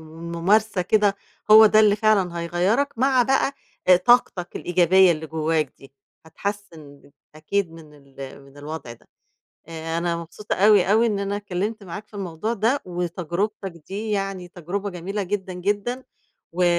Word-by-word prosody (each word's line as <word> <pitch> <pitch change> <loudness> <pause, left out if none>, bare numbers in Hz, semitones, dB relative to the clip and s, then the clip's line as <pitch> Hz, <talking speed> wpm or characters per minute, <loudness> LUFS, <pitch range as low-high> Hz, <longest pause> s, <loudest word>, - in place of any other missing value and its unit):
والممارسة 180 +5 0
كده، 205 +1 +2 0.4
هو 220 +1 +10
ده 215 0 +5
اللي 210 -1 +5
فعلًا 200 -5 +1
هيغَيّرك، 190 +12 0
مع 260 0 +3
بقى 270 +2 +1 0.5
طاقتك 195 -7 +2
الإيجابية 180 +1 +4
اللي 160 -1 -4
جواك 155 -2 -1
دي، 135 0 -17 0.3
هتحسِّن 160 -6 -8 0.2
أكيد 170 +3 -2
من 160 -2 -14
ال 140 -1 -11
من 140 +1 -18
الوضع 145 -4 -7
ده. - - -23 0.6
آآ 165 0 -4
أنا 170 0 -1
مبسوطة 170 +5 -5
أوي، 200 -1 +4
أوي 230 +2 +4
إن 205 -3 -1
أنا 200 0 -2
اتكلّمت 205 +2 -4
معاك 200 +4 -8
في - - -24
الموضوع 195 +3 -4
ده، 235 +6 +1
وتجربتك 180 +3 -3 0.2
دي 210 +3 -5
يعني 195 -3 -3
تجربة 185 +4 -5
جميلة 190 +4 -4
جدًا، 190 0 -4
جدًا، 205 +7 -2 0.5
و 180 +1 +1
185 Hz, 145 wpm, -23 LUFS, 165-210 Hz, 0.6 s, هو